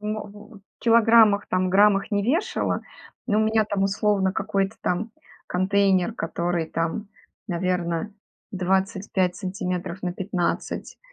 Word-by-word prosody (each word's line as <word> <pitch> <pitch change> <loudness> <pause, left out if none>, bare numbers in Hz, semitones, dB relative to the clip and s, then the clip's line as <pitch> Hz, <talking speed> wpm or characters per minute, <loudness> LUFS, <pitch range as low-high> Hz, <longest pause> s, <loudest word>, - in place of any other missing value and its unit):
мо 215 +1 -3
в 210 +1 -13 0.2
килограммах, 225 -3 +5
там, 185 0 0
граммах 200 +1 +4
не 205 -1 +1
вешала, 295 - 0 0.4
но 215 -3 +2
у - - +3
меня 220 0 +2
там, 205 -2 -2
условно, 195 -1 +1
какой-то 195 +1 -1
там 205 +6 -1 0.4
контейнер, 190 +2 +2
который 170 -3 -2
там, 165 +7 -3 0.4
наверно, 175 +1 -1 0.4
25 190 -1 0
сантиметров 185 -1 -4
на 180 - -2
15 185 -1 -3
195 Hz, 120 wpm, -24 LUFS, 180-210 Hz, 0.4 s, килограммах